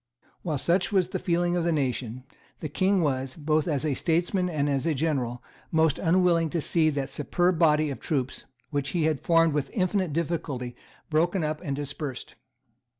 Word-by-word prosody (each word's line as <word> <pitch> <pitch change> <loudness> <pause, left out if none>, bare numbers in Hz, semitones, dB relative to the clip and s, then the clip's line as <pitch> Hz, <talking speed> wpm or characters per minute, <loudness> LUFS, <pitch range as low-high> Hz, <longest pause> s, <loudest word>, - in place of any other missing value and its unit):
While 155 -5 -2
such 175 +9 +1
was 185 -3 +2
the - - -3
feeling 175 -1 +1
of 175 - 0
the 170 - +1
nation, 130 -4 -2 0.4
the 155 - -4
King 190 +5 +2
was, 130 -2 -1
both 155 0 0
as 150 -2 0
a 150 - +1
statesman 175 +5 0
and 150 -4 0
as 140 +2 0
a 160 - +1
general, 130 -5 -1 0.3
most 160 -2 +3
unwilling 170 -1 +3
to 170 - -1
see 160 +1 +2
that 140 -3 -3
superb 175 +3 +1
body 155 -2 +4
of 135 - -6
troops 135 -6 -2 0.3
which 140 -2 -1
he 165 - +2
had 155 -3 +1
formed 165 -2 +3
with 145 -2 -1
infinite 185 -3 +1
difficulty 145 -6 -3 0.4
broken 170 +3 +2
up 155 0 -2
and 140 -5 -2
dispersed. 145 -2 -5
155 Hz, 180 wpm, -27 LUFS, 140-170 Hz, 0.4 s, body